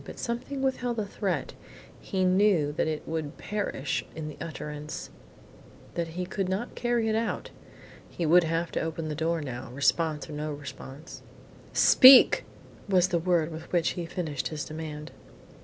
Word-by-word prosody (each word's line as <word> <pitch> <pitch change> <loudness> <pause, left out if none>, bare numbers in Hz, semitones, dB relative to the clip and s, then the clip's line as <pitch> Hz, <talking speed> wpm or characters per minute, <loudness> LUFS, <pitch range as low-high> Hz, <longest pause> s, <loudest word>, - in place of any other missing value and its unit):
But - - -10
something 250 +3 -4
withheld 250 -3 -1
the 215 - -1
threat. 185 -8 -3 0.5
He 190 -1 -2
knew 185 -5 +3
that 150 - -1
it 155 -1 -3
would 160 -2 -4
perish 200 -10 -2
in 155 -1 -5
the 150 - -10
utterance; 150 -1 -6 0.8
that 170 -1 -2
he 180 - -1
could 185 0 -3
not 200 +6 -3
carry 240 -2 0
it 220 - +1
out. 225 +1 -2 0.6
He 170 - -3
would 175 +3 +6
have 165 +1 -1
to - - -1
open 160 0 -3
the - - -2
door 160 +2 -1
now, 130 -4 -6
response 150 +4 0
or 155 - -8
no 150 0 -3
response. 140 +1 -9 0.5
"Speak!" 260 0 +8 0.4
was 185 -1 +4
the 175 -2 +1
word 170 -2 +1
with 160 0 -9
which 170 -2 +2
he 175 -2 -4
finished 160 -7 -3
his 155 -2 -5
demand. 155 -1 -7
165 Hz, 165 wpm, -28 LUFS, 150-190 Hz, 0.8 s, Speak